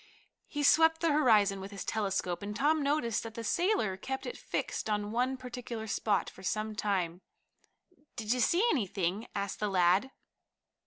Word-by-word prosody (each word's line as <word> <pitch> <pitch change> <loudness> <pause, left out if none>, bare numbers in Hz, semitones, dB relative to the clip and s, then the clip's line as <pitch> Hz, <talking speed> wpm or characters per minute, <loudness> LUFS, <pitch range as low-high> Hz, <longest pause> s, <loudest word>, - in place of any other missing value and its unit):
He 290 -1 -3
swept 320 +2 +5
the 335 -2 +3
horizon 215 -9 +4
with 195 - -7
his 200 -2 -7
telescope, 195 -4 -1
and 205 +1 -5
Tom 300 +6 +2
noticed 280 -6 0
that 225 -2 -8
the 230 - -5
sailor 340 - +1
kept 265 +6 -5
it 485 - -5
fixed - - -3
on 210 0 -1
one 250 +3 0
particular 245 -3 -6
spot 210 -1 0
for - - -11
some 215 +3 -2
time. 185 -4 -1 0.9
"Did 225 -1 0
you 250 - -2
see 345 - +3
anything?" 195 - -1
asked 200 -1 -3
the 210 - 0
lad. 185 +5 +3
220 Hz, 165 wpm, -31 LUFS, 200-265 Hz, 0.9 s, swept